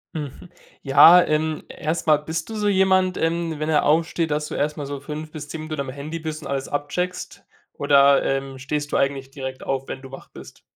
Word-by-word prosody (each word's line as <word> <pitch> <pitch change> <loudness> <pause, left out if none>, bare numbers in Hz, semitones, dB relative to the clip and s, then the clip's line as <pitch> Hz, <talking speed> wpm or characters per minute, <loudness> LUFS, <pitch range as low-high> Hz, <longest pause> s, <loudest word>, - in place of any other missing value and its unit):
Mhm. 150 +3 -7 0.3
Ja, 165 +6 +8
ähm, 155 0 -1
erst 160 +2 -3
mal, 155 -1 +5
bist 160 +2 -5
du 220 - -6
so 210 -1 -1
jemand, 190 -2 +3
ähm, 165 0 -1
wenn 155 +1 -2
er 150 -2 +3
aufsteht, 165 +2 +1
dass 150 0 -1
du - - -7
erst 150 +1 -1
mal 145 - -4
so 140 0 -5
5 155 +2 -7
bis 150 -2 -8
10 160 - -6
Minuten 155 -2 -4
am 135 - -5
Handy 145 +5 -6
bist 155 -1 -6
und - - -7
alles 135 -1 -3
abcheckst 180 +6 -4 0.3
oder, 140 -1 +4
ähm, 135 -1 -2
stehst 145 +2 -3
du - - +1
eigentlich 135 -1 -1
direkt 130 -1 -7
auf, 135 0 -3
wenn 130 - -7
du 135 - -11
wach 135 - -10
bist? - - -13
150 Hz, 220 wpm, -23 LUFS, 140-160 Hz, 0.3 s, Ja